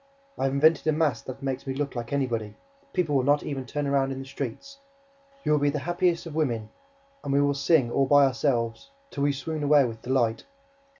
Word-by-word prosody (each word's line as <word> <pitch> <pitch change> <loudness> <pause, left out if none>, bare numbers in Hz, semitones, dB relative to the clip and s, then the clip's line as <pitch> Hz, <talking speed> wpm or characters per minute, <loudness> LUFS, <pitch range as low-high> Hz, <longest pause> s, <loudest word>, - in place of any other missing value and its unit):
I - - -1
have 135 - 0
invented 155 +3 +3
a - - +5
mask 150 -6 0
that 130 +1 -8
makes 135 0 -3
me 130 - -2
look 140 -1 -3
like 120 -1 -5
anybody. 115 -7 -2 0.4
People 160 - 0
will 135 - +4
not 145 +2 +3
even 135 -3 -5
turn 145 +3 -2
round 135 -1 +1
in 135 - -4
the 135 - -6
streets. 140 - -7 0.6
You - - 0
will 150 - +4
be 145 0 +2
the 145 - -2
happiest 175 +2 0
of 165 - -7
women. 120 -9 -1 0.5
And - - -3
we 140 - +3
will 145 0 +3
sing, 140 -3 +2
all 135 +1 +2
by 145 0 +6
ourselves, 125 - -1 0.2
till 140 - -5
we 145 - +3
swoon 155 +3 -4
away 145 -1 +5
with 115 -2 -6
delight. 120 -3 0
140 Hz, 220 wpm, -26 LUFS, 130-150 Hz, 0.6 s, by